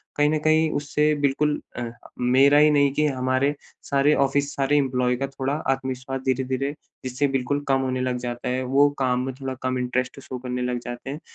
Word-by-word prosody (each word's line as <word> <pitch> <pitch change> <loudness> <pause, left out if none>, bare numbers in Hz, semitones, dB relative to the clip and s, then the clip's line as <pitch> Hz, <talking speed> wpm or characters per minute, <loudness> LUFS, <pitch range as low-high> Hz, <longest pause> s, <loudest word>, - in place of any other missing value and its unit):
कहीं 145 0 +3
न 155 - +1
कहीं 155 +1 +3
उससे 150 +1 +1
बिल्कुल 145 +1 +1 0.2
अ, - - -2 0.4
मेरा 130 +4 +5
ही 150 +1 +6
नहीं 140 -1 +4
कि 150 +2 +1
हमारे 130 +1 +1 0.4
सारे 140 +2 +3
ऑफिस 140 +1 -1
सारे 140 +1 +2
एम्प्लॉयी 125 -3 +1
का 135 - -2
थोड़ा 135 0 -3 0.2
आत्मविश्वास 130 0 -5
धीरे-धीरे, 130 +1 0 0.3
जिससे 130 +3 0
बिल्कुल 135 +1 -1
कम 135 -1 +2
होने 130 -1 -1
लग 125 -1 -1
जाता 120 +1 -4
है, 130 +1 -1
वो 140 +3 +4
काम 125 -1 +1
में 135 - -4
थोड़ा 130 -1 -3
कम 130 0 0
इंटरेस्ट 125 +1 -2
शो 130 -1 -7
करने 125 0 -4
लग 125 0 -1
जाते 120 +2 -6
हैं। 145 - -5
135 Hz, 195 wpm, -24 LUFS, 125-140 Hz, 0.4 s, ही